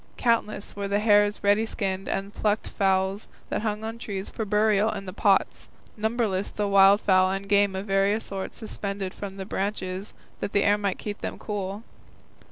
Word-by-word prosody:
Countless 230 Hz, -4 st, 0 dB
were 200 Hz, 0 st, -3 dB
the 200 Hz, +1 st, +1 dB
hares 205 Hz, -1 st, +3 dB
ready 205 Hz, +2 st, +4 dB
skinned 195 Hz, -3 st, -3 dB
and 195 Hz, +1 st, -2 dB
the -, -, -15 dB
plucked 210 Hz, 0 st, +1 dB
fowls 190 Hz, 0 st, 0 dB, 0.2 s
that -, -, -1 dB
hung 215 Hz, -1 st, -2 dB
on 225 Hz, +1 st, -4 dB
the -, -, -19 dB
trees 195 Hz, -4 st, -5 dB
for 220 Hz, -, -4 dB
burial 210 Hz, +1 st, +3 dB
in 200 Hz, -2 st, -5 dB
the 185 Hz, -, -7 dB
pots, 200 Hz, -1 st, +1 dB, 0.3 s
numberless 215 Hz, -3 st, 0 dB
the 210 Hz, -, -3 dB
wildfowl 195 Hz, -1 st, +5 dB
and 195 Hz, +1 st, -3 dB
game 200 Hz, -1 st, +3 dB
of 190 Hz, +1 st, -4 dB
various 200 Hz, +2 st, +1 dB
sorts 195 Hz, -1 st, -5 dB
suspended 200 Hz, -4 st, -4 dB
from 195 Hz, -1 st, -7 dB
the 190 Hz, -, -5 dB
branches 190 Hz, -1 st, -3 dB, 0.2 s
that -, -, -4 dB
the 200 Hz, -, +3 dB
air 205 Hz, +1 st, +3 dB
might 200 Hz, -2 st, -1 dB
keep 205 Hz, -1 st, -6 dB
them -, -, -4 dB
cool. 205 Hz, 0 st, -4 dB
200 Hz, 185 wpm, -26 LUFS, 195-210 Hz, 0.3 s, wildfowl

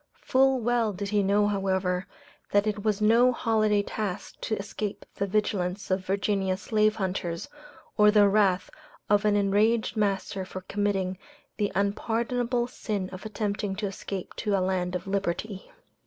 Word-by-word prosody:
Full 265 Hz, 0 st, +3 dB
well 230 Hz, -2 st, +1 dB
did 200 Hz, +2 st, -4 dB
he 210 Hz, 0 st, +2 dB
know, 200 Hz, +1 st, +3 dB
however, 190 Hz, -2 st, 0 dB, 0.4 s
that 205 Hz, +1 st, +3 dB
it 210 Hz, -1 st, -2 dB
was 215 Hz, -1 st, 0 dB
no 235 Hz, +4 st, +5 dB
holiday 215 Hz, -3 st, +2 dB
task 205 Hz, -2 st, -5 dB
to 220 Hz, -, -1 dB
escape 200 Hz, 0 st, -5 dB
the 200 Hz, -, -2 dB
vigilance 195 Hz, -2 st, -1 dB
of 185 Hz, 0 st, +1 dB
Virginia 195 Hz, 0 st, 0 dB
slave 215 Hz, +1 st, +2 dB
hunters, 180 Hz, -4 st, -3 dB, 0.5 s
or 210 Hz, -1 st, +7 dB
the 210 Hz, -1 st, +6 dB
wrath 195 Hz, -2 st, +2 dB, 0.4 s
of 205 Hz, 0 st, +4 dB
an 210 Hz, -1 st, +4 dB
enraged 205 Hz, +3 st, +2 dB
master 195 Hz, -2 st, -1 dB
for 185 Hz, 0 st, -7 dB
committing 195 Hz, -1 st, -1 dB, 0.4 s
the 205 Hz, -2 st, 0 dB
unpardonable 235 Hz, +4 st, 0 dB
sin 210 Hz, -6 st, -4 dB
of 185 Hz, +3 st, -7 dB
attempting 205 Hz, -2 st, -2 dB
to 210 Hz, +2 st, -3 dB
escape 195 Hz, -1 st, -5 dB
to 205 Hz, -2 st, 0 dB
a 185 Hz, -, +1 dB
land 180 Hz, -1 st, -1 dB
of 180 Hz, -, -4 dB
liberty. 195 Hz, +1 st, -3 dB
205 Hz, 155 wpm, -27 LUFS, 190-215 Hz, 0.5 s, or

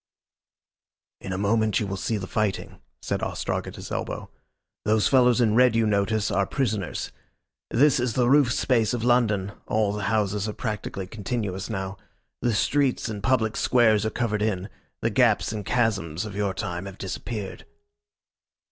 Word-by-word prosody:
"In 95 Hz, -, -7 dB
a 95 Hz, -, -2 dB
moment 110 Hz, +2 st, +2 dB
you 105 Hz, -, -1 dB
will 95 Hz, -1 st, -3 dB
see 110 Hz, +3 st, -1 dB
the 95 Hz, -, -4 dB
fighting," 105 Hz, 0 st, -2 dB, 0.2 s
said -, -, -2 dB
Ostrog -, -, -2 dB
at -, -, -8 dB
his -, -, -9 dB
elbow. -, -, -4 dB, 0.5 s
"Those 105 Hz, -2 st, +3 dB
fellows 125 Hz, -2 st, +4 dB
in 115 Hz, -3 st, +3 dB
red 125 Hz, 0 st, +5 dB
you 115 Hz, -1 st, +3 dB
notice 105 Hz, +1 st, +1 dB
are 100 Hz, -1 st, +1 dB
prisoners. 110 Hz, -8 st, -2 dB, 0.6 s
This 140 Hz, +3 st, +4 dB
is 120 Hz, -2 st, -1 dB
the 125 Hz, -2 st, +3 dB
roof 140 Hz, -2 st, +5 dB
space 120 Hz, -3 st, +2 dB
of 115 Hz, -, -4 dB
London 110 Hz, -5 st, +2 dB, 0.2 s
all 105 Hz, -2 st, +1 dB
the 105 Hz, -1 st, -3 dB
houses 105 Hz, -1 st, 0 dB
are -, -, -4 dB
practically 105 Hz, -4 st, -4 dB
continuous 100 Hz, -1 st, -4 dB
now. 95 Hz, -2 st, -4 dB, 0.4 s
The 120 Hz, -3 st, +1 dB
streets 135 Hz, +2 st, +1 dB
and 105 Hz, -2 st, -5 dB
public 110 Hz, -1 st, +1 dB
squares 110 Hz, -4 st, +3 dB
are 110 Hz, -, 0 dB
covered 110 Hz, -3 st, -1 dB
in. 100 Hz, -2 st, -1 dB, 0.3 s
The -, -, +1 dB
gaps -, -, +3 dB
and 105 Hz, -2 st, -4 dB
chasms 100 Hz, -7 st, 0 dB
of 105 Hz, -2 st, -7 dB
your 100 Hz, -2 st, -1 dB
time 90 Hz, 0 st, -4 dB
have 100 Hz, -1 st, -9 dB
disappeared." 100 Hz, 0 st, -5 dB
110 Hz, 165 wpm, -25 LUFS, 100-120 Hz, 0.6 s, red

